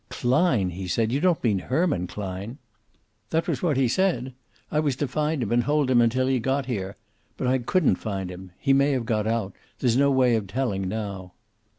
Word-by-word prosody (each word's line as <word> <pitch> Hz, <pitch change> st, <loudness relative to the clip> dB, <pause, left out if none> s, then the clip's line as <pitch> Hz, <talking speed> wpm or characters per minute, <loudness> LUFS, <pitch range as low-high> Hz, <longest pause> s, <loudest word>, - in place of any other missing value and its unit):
"Klein!" 125 Hz, -, +1 dB
he 95 Hz, +2 st, -6 dB
said. 110 Hz, +5 st, 0 dB
"You 135 Hz, -, +1 dB
don't 175 Hz, 0 st, +1 dB
mean 105 Hz, -5 st, +2 dB
Herman 130 Hz, -, 0 dB
Klein?" 100 Hz, +5 st, -6 dB, 0.7 s
"That 165 Hz, +1 st, 0 dB
was -, -, -1 dB
what 155 Hz, -6 st, +1 dB
he 135 Hz, -2 st, +3 dB
said. 130 Hz, -4 st, 0 dB, 0.4 s
I 150 Hz, -, +1 dB
was 145 Hz, -4 st, +1 dB
to 145 Hz, +2 st, -2 dB
find 150 Hz, +1 st, -1 dB
him 110 Hz, -, -4 dB
and 120 Hz, 0 st, +2 dB
hold 145 Hz, -2 st, +1 dB
him 120 Hz, -2 st, +5 dB
until 125 Hz, +2 st, +2 dB
he 130 Hz, -1 st, +1 dB
got 135 Hz, +3 st, 0 dB
here. 100 Hz, -5 st, -4 dB, 0.4 s
But -, -, -3 dB
I 130 Hz, +1 st, +2 dB
couldn't 135 Hz, -, +2 dB
find 95 Hz, -4 st, -4 dB
him. 90 Hz, 0 st, -10 dB
He 135 Hz, -, +2 dB
may 140 Hz, +1 st, +3 dB
have 125 Hz, -3 st, -1 dB
got 110 Hz, -2 st, 0 dB
out. 110 Hz, -4 st, -1 dB, 0.2 s
There's 120 Hz, -3 st, +1 dB
no 140 Hz, +1 st, +4 dB
way 130 Hz, -3 st, +3 dB
of 105 Hz, -3 st, -2 dB
telling 95 Hz, -5 st, -2 dB
now." 95 Hz, -3 st, -5 dB
125 Hz, 210 wpm, -25 LUFS, 100-140 Hz, 0.7 s, him